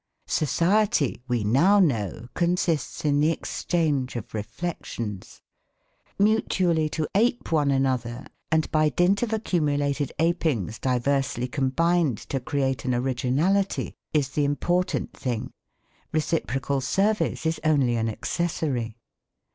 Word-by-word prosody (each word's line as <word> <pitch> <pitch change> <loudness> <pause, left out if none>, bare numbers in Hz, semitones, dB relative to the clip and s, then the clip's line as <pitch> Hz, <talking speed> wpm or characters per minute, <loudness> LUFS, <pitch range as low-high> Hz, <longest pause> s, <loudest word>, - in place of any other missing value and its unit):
Society, 170 - +1
we 120 -4 0
now 165 - +4
know, 115 - +1
consists 170 -4 0
in 145 -1 +3
the 150 +2 +4
exchange 155 -6 -1
of 115 - -6
reflections. 110 - -5 0.7
Mutually 185 -6 +2
to 155 0 -2
ape 240 +2 +1
one 150 -3 +3
another, 130 -2 0 0.3
and 160 0 +3
by 155 -1 +3
dint 175 +8 +2
of 240 -2 -1
accumulated 145 - 0
apings 155 - 0
diversely 130 0 0
combined 145 +1 +1
to 135 - -4
create 135 0 -1
an 125 -2 0
originality 135 +10 0 0.2
is 145 -3 +1
the 145 +2 0
important 175 +6 0
thing. 120 -4 -3 0.6
Reciprocal 140 -4 -1
service 195 +5 0
is 160 0 0
only 140 -6 +3
an 115 -1 0
accessory. 125 -4 -2
145 Hz, 115 wpm, -25 LUFS, 130-170 Hz, 0.7 s, now